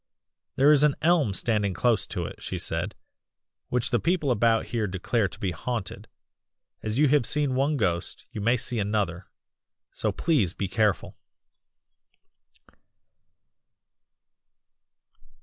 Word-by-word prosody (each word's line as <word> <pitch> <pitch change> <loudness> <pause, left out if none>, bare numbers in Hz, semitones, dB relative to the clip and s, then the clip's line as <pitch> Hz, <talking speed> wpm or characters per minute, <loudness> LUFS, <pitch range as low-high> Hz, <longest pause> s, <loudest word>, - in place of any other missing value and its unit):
'There 140 +3 +5
is 150 -1 +5
an 150 -2 +4
elm 160 - +3
standing 100 -1 0
close 120 +1 +1
to - - -3
it,' - - -9
she - - -4
said, - - -3 0.7
'which 125 -1 -1
the 120 - +2
people 165 - +1
about 115 -1 +2
here 115 -3 -2
declare 100 +3 0
to 100 - -11
be 100 -5 -1
haunted; 115 +4 -5 0.7
as 110 +1 -3
you 150 +1 +5
have 145 -2 +4
seen 145 +2 +1
one 140 +3 +1
ghost 85 -6 -2
you 110 -4 -5
may 115 +4 +3
see 120 0 -2
another 100 -3 -1 0.7
so - - -1
please 130 - +1
be 100 - -2
careful! 105 0 0
115 Hz, 130 wpm, -26 LUFS, 100-135 Hz, 0.7 s, There